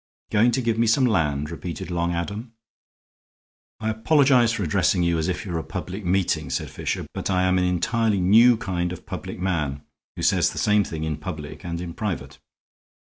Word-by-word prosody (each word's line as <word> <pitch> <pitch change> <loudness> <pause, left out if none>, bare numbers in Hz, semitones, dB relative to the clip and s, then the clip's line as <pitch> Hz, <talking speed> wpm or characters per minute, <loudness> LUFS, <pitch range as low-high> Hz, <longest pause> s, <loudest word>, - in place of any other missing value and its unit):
"Going 110 +4 +4
to 130 - 0
give 115 -1 0
me 115 - +3
some 130 +4 +4
land!" 75 - 0
repeated 90 +1 -6
Long 85 0 0
Adam. 100 +7 -4 1.3
"I 110 0 -1
apologize 125 0 +4
for 105 - -2
addressing 90 +2 +2
you 85 -1 +1
as 80 - -1
if 90 +1 -3
you 95 - -5
were 85 - -1
a - - -5
public 95 +3 -6
meeting," 85 -5 0
said 65 - -3
Fisher, - - -3
"but - - -4
I 90 -1 +2
am 95 0 +3
an 90 - +2
entirely 100 +4 +1
new 115 +6 +6
kind 90 -5 -2
of 90 - -8
public - - -6
man 75 -7 -2 0.3
who - - -6
says - - +3
the - - -9
same 105 -1 +3
thing 80 -4 -5
in 80 -1 -2
public 75 -2 -7
and 85 -2 -4
in 85 -1 -6
private. 105 -4 -4
90 Hz, 195 wpm, -24 LUFS, 85-110 Hz, 1.3 s, new